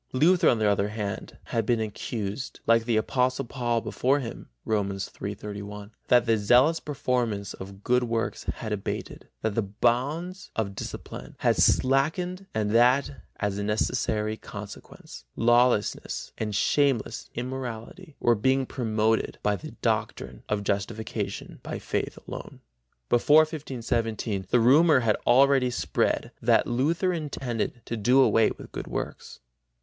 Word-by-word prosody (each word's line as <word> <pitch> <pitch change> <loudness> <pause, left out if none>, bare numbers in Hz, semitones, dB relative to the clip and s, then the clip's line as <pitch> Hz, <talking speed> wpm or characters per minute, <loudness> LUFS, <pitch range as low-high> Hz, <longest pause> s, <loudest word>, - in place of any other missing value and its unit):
Luther, 170 +7 +4
on 120 - +3
the 110 - 0
other 100 0 +2
hand, 105 -2 -5
had 115 - -1
been 115 +2 +1
accused 110 +1 -4
like 115 0 +4
the 115 -2 +2
Apostle 125 +4 +1
Paul 120 -2 -1
before 135 +5 +1
him 120 -4 -7 0.2
(Rom. 100 -2 0
3 100 +1 -5
31) 105 0 -8 0.2
that 120 -1 +5
the 115 -2 +2
zealous 125 +10 +4
performance 120 -8 -2
of 95 +1 -10
good 125 0 +2
works 115 -1 -2
had 110 -2 -3
abated, 100 -2 -5 0.2
that 110 -1 0
the 115 - +1
bonds 130 - -1
of 100 -3 -1
discipline - - -7
had - - +3
slackened 175 +8 +2
and 105 -1 -1
that, 125 +4 +4 0.3
as 100 -1 -1
a - - -2
necessary 110 0 0
consequence, 100 - -10
lawlessness 120 -2 +2
and 105 -2 -3
shameless 125 -3 +1
immorality 130 +6 -6
were 120 - +4
being 130 +5 +2
promoted 110 -3 0
by 105 0 +2
his 95 - -8
doctrine 65 -2 -1
of 105 -1 0
justification 100 +3 -3
by - - -5
faith - - -3
alone. - - -8 0.5
Before 145 +6 +6
1517 115 - -2
the 120 - +4
rumor 140 +4 +6
had 110 -2 +2
already 135 +1 +5
spread 120 - -1
that - - +4
Luther 160 +10 +1
intended 130 -7 -3
to 115 - -3
do 120 +5 +3
away 115 -4 +5
with - - -11
good - - -6
works. - - -6
115 Hz, 140 wpm, -26 LUFS, 105-130 Hz, 0.5 s, Before